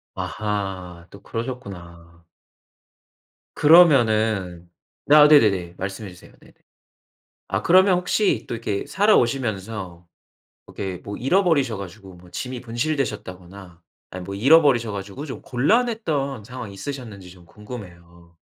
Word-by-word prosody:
아하 95 -5 -5
또 100 - -14
그러셨구나. 85 -9 -8 1.3
그러면은 110 - +4 0.4
아 150 0 +9
네네네 100 - +4
말씀해 95 +1 -6
주세요. 90 -1 -16
네네 - - -20 1.0
아 95 +2 -2
그러면 185 - +5
혹시 190 +3 0
또 - - -5
이렇게 105 -3 -3
살아오시면서 110 - 0 0.6
이렇게 95 -2 -6
뭐 100 - -6
잃어버리셔 140 - +1
가지고 95 0 -10
뭐 90 0 -17
짐이 125 -1 -5
분실되셨다거나 115 - -4 0.5
아 90 - -7
뭐 100 +2 -7
잃어버리셔 130 -2 +4
가지고 100 +8 -7
좀 135 - -8
곤란했던 145 - 0
상황이 125 -4 -8
있으셨는지 110 -5 -8
좀 90 -1 -16
궁금해요. 85 -5 -12
110 Hz, 290 characters per minute, -22 LUFS, 95-135 Hz, 1.3 s, 아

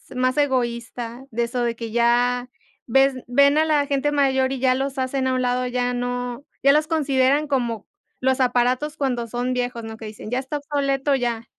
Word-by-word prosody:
más 255 +1 +1
egoísta 240 -2 -1
de 235 +1 0
eso 245 +1 -2
de 235 -1 -1
que 230 -1 -6
ya 245 +2 +2 0.4
ves 270 +3 +4
ven 280 +4 +4
a - - +4
la 295 -2 +2
gente 280 +1 0
mayor 265 -2 +2
y 270 - -3
ya 255 0 +3
los 270 +1 -3
hacen 260 0 -1
a 260 - +1
un 255 - 0
lado, 250 0 0
ya 245 0 -1
no 245 +1 -3 0.2
ya 275 +1 +6
los 305 +1 +2
consideran 285 -2 +2
como 240 -6 -2 0.3
los 260 0 +2
aparatos 255 +4 +1
cuando 250 -5 -1
son 245 +2 -2
viejos, 245 -1 -3
¿no? 225 0 -7
Que 220 - -9
dicen, 215 0 -9
ya 250 - +1
está 270 +3 -4
obsoleto, 280 -1 0
ya. 235 -3 -2
255 Hz, 195 wpm, -22 LUFS, 245-275 Hz, 0.4 s, ya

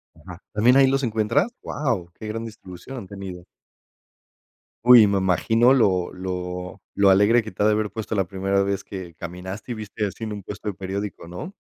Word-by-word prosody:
Ajá, 90 -2 -11
¿también 120 +5 +5
ahí 135 - +7
los 135 +1 +1
encuentras? 110 - +1
Guau, 115 - -2
qué 110 - -9
gran 115 +2 -4
distribución 110 +3 -10
han 105 -6 -7
tenido. 95 -3 -8 1.4
Uy, 120 -4 +9
me 100 0 +1
imagino 110 +6 +3
lo 95 -9 +2
lo 90 0 -5
lo 100 -1 +4
alegre 105 +5 +5
que 110 - -8
te 95 - -1
ha - - +4
de 110 - +5
haber 105 0 0
puesto 110 +2 -4
la 95 -3 +1
primera 95 +1 0
vez 100 -1 -2
que 90 -4 -8
caminaste, 95 +7 -7
y - - -2
viste 105 0 -4
así 105 +3 -5
en 110 - -4
un 100 -1 -7
puesto 105 +2 -8
de 105 - -1
periódico, 95 0 -5
¿no? 90 - -7
100 Hz, 195 wpm, -23 LUFS, 95-110 Hz, 1.4 s, Uy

